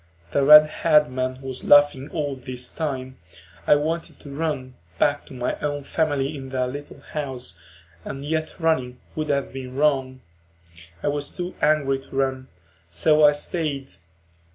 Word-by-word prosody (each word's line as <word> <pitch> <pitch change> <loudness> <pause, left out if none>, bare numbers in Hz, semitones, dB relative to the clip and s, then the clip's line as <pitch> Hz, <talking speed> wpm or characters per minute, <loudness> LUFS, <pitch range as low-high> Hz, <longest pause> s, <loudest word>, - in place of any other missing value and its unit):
The 140 - +2
red 150 +2 +10 0.2
haired 150 -3 +4
man 130 +1 -3
was 130 -1 -6
laughing 145 -1 +5
all 145 -3 -2
this 125 -1 -5
time. 130 -5 -4 0.5
I - - +7
wanted 160 +3 -2
to 140 - -10
run, 140 -4 -3 0.2
back 145 +8 +1
to - - -11
my 125 0 -2
own 145 -1 -2
family 145 -1 -1
in 135 -2 -7
their 130 -1 0
little 145 +3 -8
house, 130 - -4 0.4
and 135 +8 -6
yet 155 +1 -2
running 130 -8 0 0.2
would 155 -1 -3
have 140 -2 -1
been 130 -1 -7
wrong; 135 -3 +1 0.8
I - - +1
was 145 0 -3
too 180 0 -4
angry 140 -3 +2
to 135 - -13
run, 130 -1 -1 0.4
so 150 - +3
I 150 0 +7
stayed. 145 -3 -3
140 Hz, 155 wpm, -23 LUFS, 130-150 Hz, 0.8 s, red